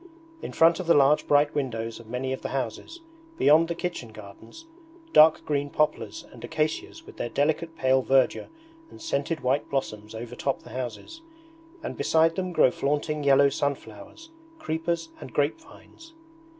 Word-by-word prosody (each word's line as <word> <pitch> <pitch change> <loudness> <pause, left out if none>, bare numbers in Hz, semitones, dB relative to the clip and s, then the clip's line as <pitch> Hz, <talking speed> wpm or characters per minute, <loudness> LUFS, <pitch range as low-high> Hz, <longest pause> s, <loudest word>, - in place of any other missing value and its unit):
In - - -6
front 165 +1 +4
of 185 - -5
the 170 - +5
large 145 +1 +4
bright 145 0 +3
windows 115 -5 -3
of 115 - -14
many 130 +3 -3
of 130 - -6
the - - -4
houses, 135 - -5 0.4
beyond 155 +3 +5
the 170 - -3
kitchen 170 -10 -5
gardens, 110 - -13 0.5
dark 155 +1 +6
green 145 -1 -1
poplars 150 +1 -1
and - - -13
acacias 155 - -3
with - - -14
their 120 - -3
delicate 160 +5 -1
pale 130 -1 +2
verdure 130 0 +2 0.4
and - - -14
scented 165 - -2
white 130 +3 0
blossoms 110 -6 -4
overtop 120 +4 -4
the - - -13
houses, 130 - -6 0.6
and - - -5
beside 160 +1 +3
them 185 -1 -3
grow 130 - +4
flaunting 150 +2 -2
yellow 140 0 +5
sunflowers, 140 - -5 0.3
creepers, 165 - -3
and 125 - -10
grape 145 - 0
vines. 325 0 -17
145 Hz, 160 wpm, -26 LUFS, 130-165 Hz, 0.6 s, dark